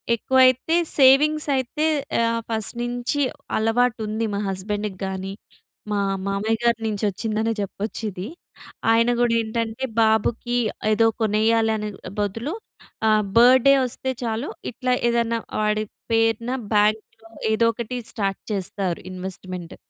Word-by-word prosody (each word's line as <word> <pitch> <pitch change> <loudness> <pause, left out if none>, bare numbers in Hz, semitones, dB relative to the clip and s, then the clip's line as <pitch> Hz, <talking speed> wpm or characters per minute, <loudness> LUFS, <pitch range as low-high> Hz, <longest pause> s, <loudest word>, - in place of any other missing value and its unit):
ఎక్కువైతే 260 +5 +3 0.2
సేవింగ్స్ 295 +3 +5
అయితే 265 +4 -1 0.4
ఆహ్, 230 0 +1
ఫస్ట్ 220 0 -1
నుంచి 245 +4 -2 0.4
అలవాటు 225 +2 +1
ఉంది 220 +2 -1
మా - - -1
హస్బండ్‌ 205 +2 -3 0.2
గాని, 190 0 -4 0.6
మా 205 -1 +1 0.3
మామయ్య 210 +3 0
గారి 235 -1 +2
నుంచొచ్చిందనే 215 +2 -1
జెప్పొచ్చు 205 +3 -4
ఇది. 185 +3 -6 0.6
ఆయన 230 +1 +4
కూడా 240 -1 +3
ఏంటంటే 225 +2 -3 0.2
బాబుకి 225 +2 +1 0.4
ఏదో 225 +1 +3 0.2
కొనేయాలి 220 +1 +2
అనే 210 0 -4 0.3
బదులు 225 - -2 0.6
ఆహ్, 215 0 +4
బర్డే 255 +3 +7
వస్తే 260 +1 -3
చాలు 230 +4 -2 0.2
ఇట్లా 250 +1 -1 0.2
ఏదన్నా 235 -1 +1 0.2
వాడి 215 0 +1 0.3
పేరున 225 +1 +1 0.2
బ్యాంక్‌లో 215 +2 0 0.2
ఏదో 230 +1 +3
ఒకటి 235 +2 -5
స్టార్ట్ 195 -3 -2
చేస్తారు 190 -2 -2
ఇన్‌వస్ట్‌మెంట్. 185 -2 -7
225 Hz, 120 wpm, -23 LUFS, 210-240 Hz, 0.6 s, బర్డే